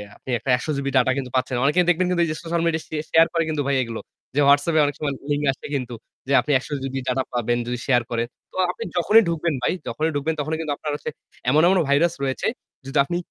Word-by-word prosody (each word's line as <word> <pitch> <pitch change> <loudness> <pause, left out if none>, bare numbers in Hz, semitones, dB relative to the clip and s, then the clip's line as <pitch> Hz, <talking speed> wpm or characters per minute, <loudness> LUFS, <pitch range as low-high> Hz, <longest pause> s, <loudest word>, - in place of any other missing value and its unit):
আপনি - - -14
একটা 130 - -6
১০০ 130 - -7
GB 140 0 -3
data 130 0 +4
কিন্তু 130 -2 -3
পাচ্ছেন। 130 0 0
অনেকেই 150 +6 +4
দেখবেন 180 +1 +3
কিন্তু 175 -1 +1
এই 165 - -4
যে - - -3
social 170 0 -1
media 165 -1 +1
স - - -20 0.3
share 165 0 +6
করে 165 -1 +2
কিন্তু 155 -2 -1
ভাই 140 - +2
এইগুলো। 115 -2 -4 0.4
যে - - +2
WhatsApp 145 +3 +4
এ - - +6
অনেক 145 - -2
সময় 145 -2 -1 0.2
link 145 0 0
আসে 135 - -11
কিন্তু 125 -3 -3 0.3
যে 140 - 0
আপনি 150 - -3
১০০ - - -11
GB 135 0 -4
data 130 +1 +1
পাবেন 120 0 0
যদি 125 0 -2
share 125 -3 +3
করেন। 115 0 -1 0.2
তো - - -19 0.2
আপনি 230 - -7
যখনই 210 +6 +5
ঢুকবেন 165 -1 0
ভাই, 125 - +1
যখনই 160 +1 -1
ঢুকবেন 150 +3 0
তখনই 155 +2 -1
কিন্তু 150 -3 -2
আপনার 150 - -4
হচ্ছে 150 - -5 0.4
এমন, 150 +4 +5
এমন 190 +1 +4
virus 165 +4 +3
রয়েছে 130 -1 -1 0.4
যদি 135 +2 -3
আপনি 175 +5 -2
145 Hz, 245 wpm, -23 LUFS, 130-165 Hz, 0.4 s, share